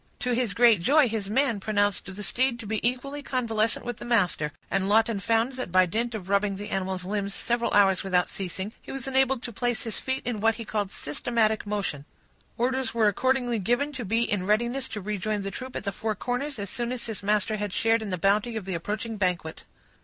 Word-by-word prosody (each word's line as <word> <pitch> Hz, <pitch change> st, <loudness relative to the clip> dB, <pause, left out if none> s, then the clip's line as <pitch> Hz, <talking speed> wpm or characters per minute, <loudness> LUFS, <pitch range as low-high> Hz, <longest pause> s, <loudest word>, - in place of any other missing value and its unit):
To 250 Hz, -, -1 dB
his 235 Hz, -4 st, 0 dB
great 230 Hz, -6 st, +6 dB
joy, 285 Hz, -, +5 dB
his 215 Hz, -3 st, -3 dB
man 235 Hz, -1 st, +2 dB
pronounced 205 Hz, -1 st, +1 dB
the 210 Hz, -, -6 dB
steed 250 Hz, +4 st, +1 dB
to 230 Hz, -, -7 dB
be 215 Hz, +1 st, -1 dB
equally 255 Hz, +4 st, -1 dB
convalescent 230 Hz, -5 st, 0 dB
with 240 Hz, -2 st, -4 dB
the -, -, -9 dB
master; 180 Hz, -10 st, +1 dB, 0.2 s
and 195 Hz, 0 st, +1 dB
Lawton 220 Hz, 0 st, +3 dB
found 225 Hz, +5 st, +1 dB
that 255 Hz, -8 st, -4 dB
by 185 Hz, +1 st, +6 dB
dint 230 Hz, +6 st, -2 dB
of 190 Hz, -4 st, -6 dB
rubbing 200 Hz, 0 st, +2 dB
the 205 Hz, +2 st, -7 dB
animal's 190 Hz, -1 st, -2 dB
limbs 200 Hz, 0 st, -2 dB
several 235 Hz, 0 st, 0 dB
hours 195 Hz, -2 st, +4 dB
without 180 Hz, -2 st, +2 dB
ceasing, 190 Hz, +2 st, -4 dB
he -, -, -9 dB
was 270 Hz, -2 st, -4 dB
enabled 265 Hz, -1 st, +2 dB
to 235 Hz, -, -5 dB
place 240 Hz, +2 st, -1 dB
his 225 Hz, -, -3 dB
feet 265 Hz, 0 st, -2 dB
in 240 Hz, -4 st, -2 dB
what 225 Hz, +2 st, +3 dB
he 230 Hz, -, -7 dB
called 210 Hz, -2 st, -1 dB
systematic 220 Hz, +8 st, 0 dB
motion. 195 Hz, -9 st, -2 dB, 0.5 s
Orders 255 Hz, 0 st, 0 dB
were 220 Hz, -2 st, +4 dB
accordingly 245 Hz, +1 st, +1 dB
given 245 Hz, +9 st, +1 dB
to 255 Hz, -3 st, -4 dB
be 225 Hz, +3 st, +1 dB
in 195 Hz, -5 st, -1 dB
readiness 240 Hz, +5 st, +1 dB
to 210 Hz, -, -5 dB
rejoin 210 Hz, +1 st, -2 dB
the 195 Hz, -, -3 dB
troop 255 Hz, +3 st, -7 dB
at -, -, -3 dB
the 200 Hz, -, -1 dB
Four 215 Hz, +3 st, -2 dB
Corners, 250 Hz, +6 st, -3 dB
as 200 Hz, -2 st, -5 dB
soon 240 Hz, 0 st, -2 dB
as 250 Hz, -2 st, -3 dB
his 220 Hz, -3 st, -5 dB
master 210 Hz, +1 st, +1 dB
had 205 Hz, -1 st, -3 dB
shared 225 Hz, +3 st, +2 dB
in 215 Hz, -, -4 dB
the 185 Hz, -, -1 dB
bounty 205 Hz, +6 st, +2 dB
of 215 Hz, -4 st, -4 dB
the 190 Hz, -, -3 dB
approaching 210 Hz, +6 st, -3 dB
banquet. 180 Hz, -5 st, -2 dB
220 Hz, 220 wpm, -27 LUFS, 200-240 Hz, 0.5 s, great